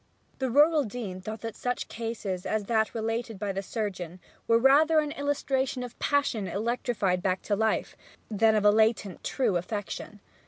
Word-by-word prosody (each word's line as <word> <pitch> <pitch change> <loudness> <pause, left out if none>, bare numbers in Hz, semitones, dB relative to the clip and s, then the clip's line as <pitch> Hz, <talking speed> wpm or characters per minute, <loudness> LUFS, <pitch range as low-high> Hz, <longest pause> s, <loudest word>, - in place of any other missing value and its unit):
The 260 -1 0
rural 295 +4 +5
dean 205 -5 -6
thought 215 +2 -6
that 225 -2 -5
such 245 0 -2
cases 220 -5 -4
as 215 -1 0
that 220 +1 0
related 225 0 -2
by 200 +1 -2
the 195 0 -3
surgeon 185 -5 -4 0.3
were 230 - +5
rather 290 +6 +5
an 300 -1 +2
illustration 275 -3 -1
of 245 - -9
passion 280 -8 +1
electrified 210 -4 -1
back 185 0 0
to 205 - 0
life 220 +1 0 0.3
than 220 0 +3
of 210 -1 +1
a 205 - +8
latent, 215 -3 +1
true 230 -9 +1
affection. 205 +2 -5
220 Hz, 165 wpm, -28 LUFS, 200-250 Hz, 0.3 s, a